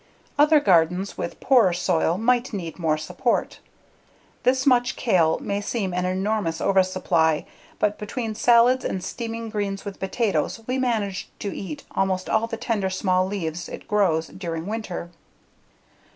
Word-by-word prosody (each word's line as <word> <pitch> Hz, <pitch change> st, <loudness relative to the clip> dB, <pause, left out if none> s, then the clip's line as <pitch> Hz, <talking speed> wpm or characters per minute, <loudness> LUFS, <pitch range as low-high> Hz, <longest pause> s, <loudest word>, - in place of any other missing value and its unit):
Other 300 Hz, +1 st, +5 dB
gardens 180 Hz, -, +2 dB
with -, -, -5 dB
poorer 235 Hz, -9 st, +4 dB
soil 175 Hz, -1 st, +1 dB
might 245 Hz, +3 st, +1 dB
need 175 Hz, -4 st, -5 dB
more 160 Hz, -2 st, +1 dB
support. 180 Hz, +9 st, -1 dB, 0.8 s
This 260 Hz, +1 st, +2 dB
much 250 Hz, -1 st, +3 dB
kale 175 Hz, -9 st, +2 dB
may 200 Hz, 0 st, -3 dB
seem 205 Hz, -3 st, -2 dB
an 180 Hz, 0 st, -1 dB
enormous 190 Hz, -2 st, -1 dB
oversupply, 185 Hz, -5 st, +2 dB, 0.3 s
but 210 Hz, 0 st, 0 dB
between 220 Hz, +1 st, -4 dB
salads 240 Hz, +3 st, +4 dB
and 185 Hz, -, -3 dB
steaming 230 Hz, -1 st, -5 dB
greens 200 Hz, -2 st, -3 dB
with 200 Hz, -1 st, -7 dB
potatoes 195 Hz, -2 st, -1 dB
we 255 Hz, +2 st, -1 dB
manage 215 Hz, -6 st, -1 dB
to 200 Hz, -, -5 dB
eat 165 Hz, -6 st, -6 dB
almost 190 Hz, -1 st, -1 dB
all 220 Hz, +1 st, +2 dB
the 225 Hz, -, -5 dB
tender 205 Hz, -5 st, -1 dB
small 185 Hz, -1 st, +1 dB
leaves 175 Hz, -4 st, -4 dB
it -, -, -9 dB
grows 175 Hz, -6 st, +1 dB
during 165 Hz, -3 st, -5 dB
winter. 200 Hz, -5 st, -5 dB
195 Hz, 145 wpm, -24 LUFS, 180-230 Hz, 0.8 s, Other